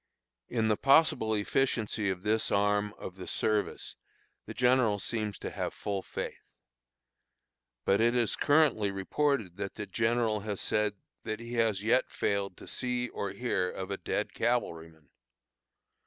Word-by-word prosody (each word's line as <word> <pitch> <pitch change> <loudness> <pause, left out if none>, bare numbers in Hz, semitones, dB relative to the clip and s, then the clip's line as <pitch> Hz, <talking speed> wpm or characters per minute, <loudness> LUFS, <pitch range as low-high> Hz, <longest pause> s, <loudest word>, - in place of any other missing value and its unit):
In 115 -2 +1
the 105 -1 +2
possible 135 -6 +4
efficiency 110 -1 0
of 95 -1 -3
this 110 +1 +1
arm 105 +1 +2
of 95 - -8
the 90 - -8
service 105 -1 -1 0.5
the - - -6
general 125 -4 +3
seems 105 0 -2
to - - -6
have - - -3
full 100 -2 -3
faith. - - -6 1.4
But 100 +2 +3
it 120 +1 +3
is 120 -3 +1
currently 145 -9 +3
reported 100 - -1
that 100 -1 -4
the 105 - -5
general 115 0 +1
has 105 -1 -4
said 105 -1 +1 0.3
"that 110 - -3
he 115 +1 -8
has 110 -4 +1
yet 125 +4 +3
failed 100 -2 -1
to - - -12
see 125 -1 -1
or 100 - -3
hear 95 -3 -1
of 95 +1 -6
a 100 - -2
dead - - -2
cavalryman." 80 - -2
110 Hz, 150 wpm, -30 LUFS, 100-120 Hz, 1.4 s, possible